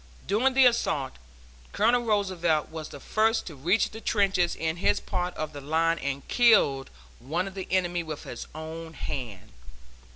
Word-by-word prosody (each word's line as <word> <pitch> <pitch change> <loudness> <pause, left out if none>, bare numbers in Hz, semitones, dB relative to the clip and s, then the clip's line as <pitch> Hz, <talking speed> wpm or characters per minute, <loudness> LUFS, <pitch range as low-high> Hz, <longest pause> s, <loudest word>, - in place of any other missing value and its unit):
During 250 +7 +2
the 265 -1 +7
assault, 150 - +1 0.6
Colonel 235 +4 +3
Roosevelt 185 -8 0
was 160 -1 -7
the 140 - -10
first 220 +7 +1
to 160 - -8
reach 175 +11 +1
the 220 - -9
trenches 195 -6 +1
in 160 +1 -2
his 205 +3 +2
part 180 0 -3
of 155 -1 -4
the 145 - -7
line 165 +3 +1
and 140 0 -4
killed 205 - +4 0.3
one 170 +8 -2
of 195 - -8
the 190 -1 -6
enemy 175 -1 +1
with 155 -3 -7
his 120 - -7
own 160 +1 -7
hand. 110 - -6
175 Hz, 165 wpm, -27 LUFS, 155-205 Hz, 0.6 s, the